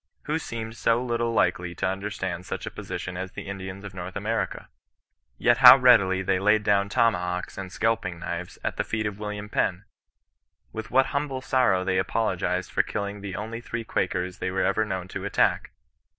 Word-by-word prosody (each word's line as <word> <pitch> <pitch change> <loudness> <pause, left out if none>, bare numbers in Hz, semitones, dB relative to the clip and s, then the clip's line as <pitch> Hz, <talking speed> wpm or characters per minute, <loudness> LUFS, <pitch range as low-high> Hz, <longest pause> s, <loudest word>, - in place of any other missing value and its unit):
Who 155 +2 -1
seemed 115 -6 -6
so 115 0 +2
little 120 -1 -1
likely 90 -6 +1
to - - -2
understand 95 -2 -3
such - - -4
a - - -5
position 90 0 -6
as 95 0 -5
the - - -6
Indians 95 0 -6
of 100 -2 -8
North 90 0 -7
America? 110 +3 -2 0.7
Yet - - +3
how - - +11
readily 100 -7 +5
they 95 0 +1
laid 105 +2 +3
down 100 -1 +2
tomahawks 90 -7 0
and 95 -1 -6
scalping 105 -5 -1
knives 85 +1 -5
at - - -2
the - - +1
feet 110 -1 -2
of 105 -1 -4
William 105 -1 -5
Penn! 95 -2 0 0.9
With 110 0 -6
what 135 +2 +4
humble 140 -2 -2
sorrow 120 -9 +2
they 95 0 +1
apologized 95 -3 -1
for - - +3
killing 100 0 -4
the 100 -2 -5
only 110 +4 -5
three 120 0 -5
Quakers 90 -4 -2
they - - -2
were 95 +1 0
ever 100 +3 +2
known 95 -4 -4
to 95 -1 -6
attack 100 - +1
100 Hz, 185 wpm, -26 LUFS, 95-115 Hz, 0.9 s, how